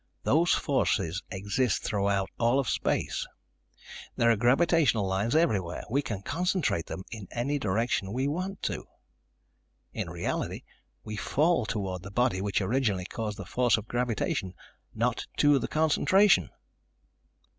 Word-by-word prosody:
Those 170 +4 +3
forces 105 - 0
exist 100 +4 -1
throughout 100 -2 0
all 120 +3 +3
of 135 - -1
space. - - -1 0.9
There 115 0 +4
are - - +4
gravitational 125 - +3
lines 95 +7 0
everywhere. 100 - +1
We 140 +3 +2
can 105 -8 -5
concentrate 175 - 0
them 95 - -6
in 110 -5 -7
any 140 +5 -1
direction 105 -2 0
we 130 +5 0
want 185 +6 -3
to. - - -3 1.1
In - - -4
reality, - - -3 0.4
we 110 0 -6
fall 145 - +1
toward 95 -4 -3
the 100 - -9
body 115 -2 +1
which 100 +1 0
originally 100 -3 0
caused 105 +1 -4
the - - -7
force 125 -2 +2
of 110 0 -7
gravitation, 115 -6 -1 0.4
not - - -1
to 145 -1 +5
the - - -3
concentration." 185 +6 +3
115 Hz, 135 wpm, -28 LUFS, 100-140 Hz, 1.1 s, to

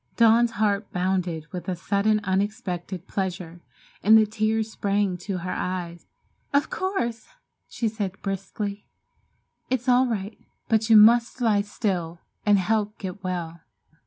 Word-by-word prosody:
Dawn's 230 0 +5
heart 205 -2 0
bounded 180 -3 -1
with 180 0 -6
a 185 - -1
sudden, 205 +4 +1
unexpected 190 -2 -2
pleasure, 180 -3 -4 0.4
and 220 +2 +7
the 220 - +5
tears 220 +1 -1
sprang 200 -2 0
to 185 +2 -4
her 180 +1 -4
eyes. 175 -2 -4 0.5
"Of 285 - +2
course!" 240 - -2 0.4
she 230 - -2
said 205 -3 -4
briskly, 200 +1 -4 0.8
"it's 255 0 -1
all 255 +1 +5
right, 210 -2 -4 0.3
but 220 0 +1
you 220 - +8
must 235 +4 +6
lie 220 -4 +3
still 180 -5 -3 0.3
and 205 -1 +6
help 210 +2 0
get 190 0 -7
well." 170 -2 -4
205 Hz, 135 wpm, -25 LUFS, 185-220 Hz, 0.8 s, you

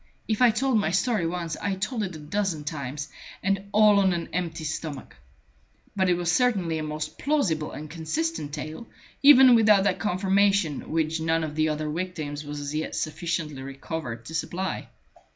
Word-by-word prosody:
If 220 +1 -1
I 250 - +7
told 240 +1 +2
my 195 - 0
story 195 0 +1
once, 170 -1 -3
I 200 -1 -1
told 215 +5 -2
it 185 -4 -3
a - - -8
dozen 165 0 -2
times, 145 -1 -5 0.3
and 195 0 0
all 210 -1 +6
on 190 -2 +3
an 170 -1 -3
empty 170 -3 -3
stomach. 155 -3 -5 0.8
But 190 -2 +2
it 175 - +4
was 175 -1 0
certainly 185 -8 +1
a - - -3
most 150 0 -5
plausible 195 - 0
and 155 - -7
consistent 165 - -3
tale, 155 +8 -6 0.3
even 265 -3 +9
without 210 -4 +5
that 195 -2 +1
confirmation 195 -4 +1
which 160 0 0
none 165 0 +1
of 155 -1 -4
the 155 0 +1
other 155 0 -2
victims 155 -3 -4
was 145 0 -6
as 145 0 -5
yet 155 +1 -3
sufficiently 155 -3 -3
recovered 135 -3 -6
to 160 - -9
supply. 185 +3 -3
170 Hz, 175 wpm, -26 LUFS, 155-200 Hz, 0.8 s, even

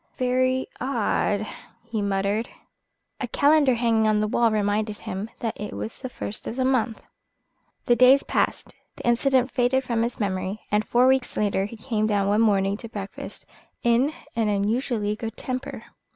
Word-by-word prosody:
"Very 255 +1 +1
odd!" 220 -4 0 0.4
he 230 -2 -3
muttered. 200 +3 0 0.7
A - - -2
calendar 285 -3 +4
hanging 225 -2 +2
on 215 -1 +3
the 215 - +1
wall 230 +2 +3
reminded 210 0 0
him 195 +4 -5
that 225 -2 -2
it 210 - -5
was 220 - -6
the 260 - -5
first 215 -3 -6
of - - -4
the 260 0 0
month. 250 -4 0 0.8
The 240 - +4
days 255 +3 +6
passed, - - -1 0.2
the - - -9
incident 255 +2 +3
faded 260 +1 +2
from 235 -3 -1
his 235 +1 -2
memory, 190 0 -2
and 210 +1 +2
four 240 +3 +3
weeks 260 -1 +2
later 200 -2 +1
he 220 +3 -8
came 215 -1 -1
down 200 -2 +1
one 205 +2 +3
morning 200 -2 +2
to 230 - -9
breakfast 200 -2 -7 0.4
in 240 +5 +3 0.2
an 225 -2 +1
unusually 210 +1 0
good 225 0 -6
temper. 255 +1 -5
225 Hz, 165 wpm, -25 LUFS, 210-250 Hz, 0.8 s, days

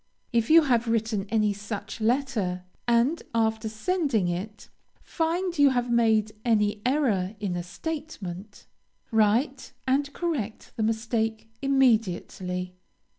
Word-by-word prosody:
If 230 -1 +2
you 325 +1 +8
have 240 -4 +2
written 220 -3 0
any 215 -2 +2
such 210 +1 -6
letter, 220 -7 0 0.2
and, 240 +7 +3
after 220 -1 +1
sending 240 - 0
it, 195 +5 -5 0.4
find 345 +2 -1
you 285 -1 +7
have 245 -2 0
made 220 -2 +3
any 210 -3 +2
error 220 -9 +1
in 195 -4 -2
a 175 - -2
statement, 205 - -6 0.5
write, 230 +5 +1
and 280 +2 +1
correct 285 - -3
the - - -3
mistake 225 0 -1
immediately. 200 -8 +1
225 Hz, 120 wpm, -26 LUFS, 210-270 Hz, 0.5 s, you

